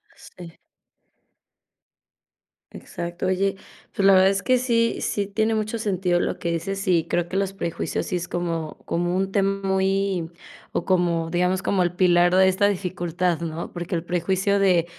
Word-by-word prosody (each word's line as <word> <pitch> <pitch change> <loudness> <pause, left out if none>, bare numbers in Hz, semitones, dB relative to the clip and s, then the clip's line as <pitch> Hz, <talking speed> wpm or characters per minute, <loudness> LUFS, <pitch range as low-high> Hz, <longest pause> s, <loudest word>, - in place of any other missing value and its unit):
Sí. 170 -2 -13 2.2
Exacto. 175 +2 -5
Oye, 195 +1 +1 0.4
pues 195 - 0
la 195 - +7
verdad 190 0 +6
es 195 0 -1
que 255 -1 +3
sí 235 -2 +1
sí 205 - -1
tiene 220 +2 0
mucho 215 +1 -2
sentido 185 -5 0
lo - - -1
que 170 - -3
dices, 195 +4 -3
y 170 -3 +3
creo 175 0 -1
que 190 - -2
los 195 -1 -1
prejuicios 170 -4 -3
sí 180 - -1
es 175 - -5
como 165 -3 -3
como 175 +1 -1
un 195 0 -1
tema 195 0 0
muy 190 -2 0 0.4
o, - - -1
como, 175 -3 +1
digamos, 180 +2 +1
como 195 -2 +1
el 175 0 +1
pilar 175 -1 +4
de 190 0 +6
esta 195 +2 +2
dificultad, 175 -3 -1
¿no? 165 0 -5
Porque 175 0 -4
el 165 - -2
prejuicio 190 +3 0
de 180 -4 +3
185 Hz, 170 wpm, -23 LUFS, 175-195 Hz, 2.2 s, la